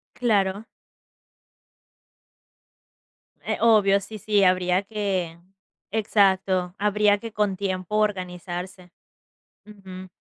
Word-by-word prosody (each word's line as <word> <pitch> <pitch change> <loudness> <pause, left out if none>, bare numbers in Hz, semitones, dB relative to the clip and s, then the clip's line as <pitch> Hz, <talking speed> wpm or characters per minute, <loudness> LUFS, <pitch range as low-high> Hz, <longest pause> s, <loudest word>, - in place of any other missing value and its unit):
Claro. 205 -3 0 2.8
Eh, - - -2
obvio. 205 -3 +4
Sí, 215 +2 -9
sí, 205 0 +1
habría 185 +1 +2
que 195 -5 -3 0.5
exacto, 190 -4 +1
habría 210 0 +2
que, 230 +2 -8
con 205 -2 0
tiempo, 185 +1 -3
organizarse. 180 -2 -4 0.7
Ujú. 190 -3 -11
195 Hz, 80 wpm, -24 LUFS, 185-210 Hz, 2.8 s, obvio